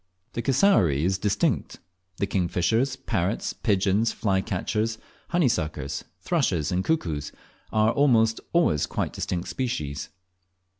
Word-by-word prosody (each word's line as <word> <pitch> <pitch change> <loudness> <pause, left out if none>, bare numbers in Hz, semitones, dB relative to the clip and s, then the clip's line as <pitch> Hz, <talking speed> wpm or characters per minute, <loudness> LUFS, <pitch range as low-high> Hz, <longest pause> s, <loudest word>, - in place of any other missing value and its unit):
The 120 - -2
cassowary 120 - +3
is 95 +1 +1
distinct; 100 0 0 0.4
the - - 0
kingfishers, 95 +8 +1
parrots, 105 -6 -2
pigeons, 100 +2 +1
flycatchers, 105 +2 -1 0.3
honeysuckers, 80 - 0 0.2
thrushes, 75 -3 0
and 90 +1 0
cuckoos, 80 - -1 0.4
are 110 +1 +3
almost 115 -5 +3
always 160 - +2
quite - - -2
distinct 90 -1 -3
species. 80 - -3
100 Hz, 105 wpm, -26 LUFS, 85-120 Hz, 0.4 s, cassowary